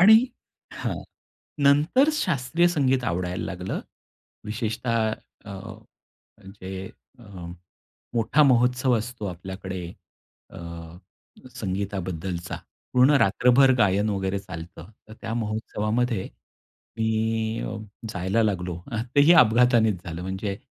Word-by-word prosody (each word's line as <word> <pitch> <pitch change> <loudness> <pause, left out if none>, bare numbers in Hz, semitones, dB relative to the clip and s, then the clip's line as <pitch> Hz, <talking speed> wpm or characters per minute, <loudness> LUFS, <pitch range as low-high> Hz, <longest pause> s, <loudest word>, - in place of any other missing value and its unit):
आणि 215 +4 +9 0.6
हां, - - -3 0.7
नंतर 155 - +5
शास्त्रीय 170 - +1
संगीत 135 -6 +1
आवडायला 90 +1 -2
लागलं. 90 0 -4 0.6
विशेषतः 110 +1 -1 0.3
अ, 105 - -9 0.7
म्हणजे 95 -1 -9 0.3
अ, 120 - -14 0.9
मोठा 120 +6 +3
महोत्सव 125 +1 +3
असतो 115 0 -5
आपल्याकडे 95 +1 -6 0.7
अ, - - -12 1.0
संगीताबद्दलचा 95 -3 -3 0.4
पूर्ण 125 +3 +6
रात्रभर 125 +6 +5
गायन 105 +1 +3
वगैरे 95 0 -1
चालतं. 90 -1 -9 0.2
तर 110 - -11
त्या 115 - -4
महोत्सवामध्ये 110 0 -1 0.7
मी 110 0 0 0.5
अ, 110 - -4 0.3
जायला 95 +4 0
लागलो. 90 -4 -1 0.4
तेही 145 +4 +7
अपघातानेच 110 -4 +3
झालं 85 -1 -6
म्हणजे 95 +2 -3
110 Hz, 95 wpm, -25 LUFS, 95-125 Hz, 1.0 s, आणि